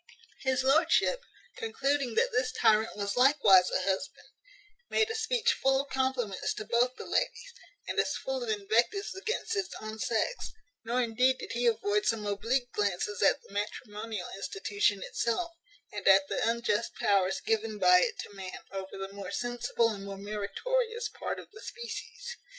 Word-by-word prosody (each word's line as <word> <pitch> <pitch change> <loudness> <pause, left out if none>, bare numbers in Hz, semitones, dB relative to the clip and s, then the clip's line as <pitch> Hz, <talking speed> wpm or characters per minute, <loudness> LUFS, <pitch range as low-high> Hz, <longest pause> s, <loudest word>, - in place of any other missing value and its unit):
His 260 -1 +1
lordship, 320 - +3 0.4
concluding 280 - -1
that - - +3
this 250 0 +1
tyrant 220 -3 +3
was 200 -1 -2
likewise 245 -9 +6
a 185 - 0
husband, 190 +8 -3 0.6
made 440 0 +2
a - - -3
speech 450 +1 +2
full 270 0 +2
of 280 - -13
compliments 260 -7 -1
to 215 - -5
both 245 +3 +2
the - - -8
ladies, - - -1 0.3
and - - -1
as - - +1
full - - -3
of 475 - -4
invectives 410 -1 +1
against 435 +4 -3
his 405 -3 -1
own 215 0 -7
sex; 235 - -1 0.3
nor 245 +2 +1
indeed 250 +3 +2
did - - -7
he 240 +1 +1
avoid 210 -2 +1
some 220 -2 0
oblique 230 +5 0
glances 200 0 -1
at - - +3
the - - -17
matrimonial 210 -1 -4
institution 200 0 0
itself, 335 +9 -1 0.4
and 205 -2 -4
at 195 0 +7
the - - +1
unjust 235 -1 0
powers 195 -2 +2
given 220 -1 -1
by 180 -2 +6
it - - 0
to - - -10
man 190 -2 -8
over 195 0 -6
the 195 0 -6
more 200 -2 -7
sensible 240 +1 0
and 205 -3 -5
more 195 -1 -6
meritorious 450 - -2
part - - -4
of - - -13
the 425 - -13
species. 475 0 -7
230 Hz, 165 wpm, -30 LUFS, 205-275 Hz, 0.6 s, at